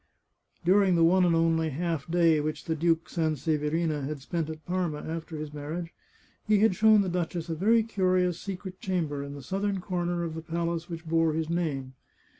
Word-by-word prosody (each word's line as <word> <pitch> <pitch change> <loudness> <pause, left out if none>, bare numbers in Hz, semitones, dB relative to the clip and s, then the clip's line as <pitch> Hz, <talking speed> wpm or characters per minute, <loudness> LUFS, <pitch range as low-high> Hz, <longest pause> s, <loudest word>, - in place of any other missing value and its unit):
During 190 0 +4
the 165 - +4
one 180 +2 +5
and 170 -1 +3
only 165 -1 +2
half 165 0 -3
day 165 -2 +4
which 155 +1 -3
the 165 - 0
Duke 165 +1 +1
San 160 -2 0
severina 150 +1 -1
had 145 +1 -4
spent 160 +3 -3
at 155 -1 -8
Parma 175 -4 -1
after 165 0 -5
his 150 -1 -6
marriage, 160 +4 -5 0.5
he 215 0 +4
had 215 0 +4
shown 215 +2 +5
the 195 - -1
duchess 175 -1 -2
a 165 - -1
very 220 +7 +3
curious 185 -5 +1
secret 190 -1 -7
chamber 165 -7 -2
in 140 0 -7
the 140 - -9
southern 195 +5 -1
comer 175 -1 -2
of 165 -2 -3
the 160 - -5
palace 170 +1 -3
which 165 0 -6
bore 165 0 +2
his 160 +1 -2
name. 140 -7 -2
165 Hz, 195 wpm, -28 LUFS, 155-180 Hz, 0.5 s, one